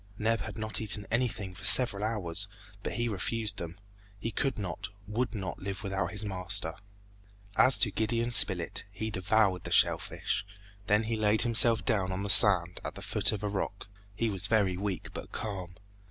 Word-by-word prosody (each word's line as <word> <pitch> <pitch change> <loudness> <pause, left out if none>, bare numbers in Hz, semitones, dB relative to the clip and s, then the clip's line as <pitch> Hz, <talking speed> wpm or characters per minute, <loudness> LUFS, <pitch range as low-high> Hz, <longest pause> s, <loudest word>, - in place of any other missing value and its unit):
Neb 110 +1 -1
had - - -8
not 110 0 -4
eaten 105 -1 +1
anything 115 -5 -2
for - - -12
several 115 -6 +4
hours, 100 -4 -3 0.3
but - - -6
he 120 0 -2
refused 110 +1 -4
them. 85 +1 -8 0.4
He 115 +3 -5
could 135 +2 -3
not, 95 -6 -6 0.2
would 115 +4 -4
not 95 -3 -6
live 100 +2 -7
without 95 -1 -3
his 105 0 -4
master. 90 -4 -4 0.8
As 130 -3 +5
to 100 +1 +3
Gideon 115 +3 -2
Spilett, 95 -7 +5
he 110 +3 -6
devoured 95 0 0
the - - -7
shell - - +3
fish, 95 - -4 0.4
then 105 +2 +2
he 115 +1 -3
laid 110 0 0
himself 115 -1 +3
down 100 -6 -1
on 95 +2 -4
the 100 - +2
sand, 90 -5 +9
at - - -7
the - - -10
foot - - +1
of 105 -1 -6
a - - -2
rock. 100 0 -6 0.3
He 115 +2 -2
was 95 0 0
very 100 -5 0
weak, 100 0 -5
but - - -9
calm. 95 -5 -7
105 Hz, 185 wpm, -28 LUFS, 95-110 Hz, 0.8 s, sand